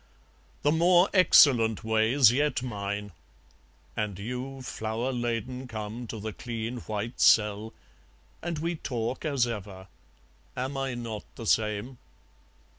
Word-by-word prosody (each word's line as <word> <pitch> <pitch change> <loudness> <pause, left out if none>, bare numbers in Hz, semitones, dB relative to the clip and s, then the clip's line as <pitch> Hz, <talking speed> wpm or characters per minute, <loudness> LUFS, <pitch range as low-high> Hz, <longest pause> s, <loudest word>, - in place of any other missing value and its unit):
The 145 - +4
more 175 +3 +4
excellent 125 - +5
way's 110 +3 +4
yet 145 0 0
mine! 100 -3 -4 0.8
And 105 -3 -2
you 125 +5 -5
Flower 115 +2 -3
laden 120 +2 -3
come 110 +1 -6
to 110 - -6
the 110 +1 -5
clean 115 +1 -5
white 110 +2 -5
cell, 105 0 +4 0.7
And 170 -1 -3
we 165 +2 -2
talk 120 0 -3
as 140 -5 +2
ever 100 -5 -6 0.7
am 130 +2 -3
I 135 -2 -2
not 115 -3 -6
the 115 - -8
same? 110 +4 0
120 Hz, 120 wpm, -28 LUFS, 110-130 Hz, 0.8 s, excellent